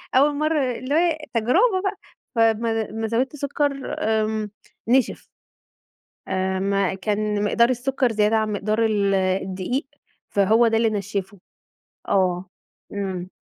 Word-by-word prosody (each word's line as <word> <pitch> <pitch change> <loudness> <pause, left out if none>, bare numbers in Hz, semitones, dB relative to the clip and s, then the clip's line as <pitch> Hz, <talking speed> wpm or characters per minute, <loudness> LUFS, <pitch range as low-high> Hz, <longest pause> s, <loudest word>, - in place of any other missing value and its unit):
أول 285 +2 +4
مرّه 300 -4 +1
اللي 255 +4 -3
هو 330 -1 +3 0.2
تجربة 370 - +3
بقى، 395 0 -2 0.4
فامّا 225 0 +2
لما 220 +1 -4
زوّدت 250 +6 -1
سكر، 285 -1 -2
آمم 215 -1 0 0.4
نِشِف. 255 +2 +2 1.0
آآ، 190 0 -1
ما 195 -1 +1
كان 210 +1 -1
مقدار 235 +3 +3
السكر 255 0 0
زيادة 215 0 +2
عن 215 -1 0
مقدار 215 +3 0
ال 200 -2 +1
الدقيق، 190 - -1 0.4
فهو 220 +4 +4
ده 225 0 +2
اللي 225 0 +3
نشِّفُه، 200 -1 -4 0.7
آه، 185 -2 +1 0.5
إمم. 190 -3 -4
220 Hz, 125 wpm, -23 LUFS, 200-255 Hz, 1.0 s, أول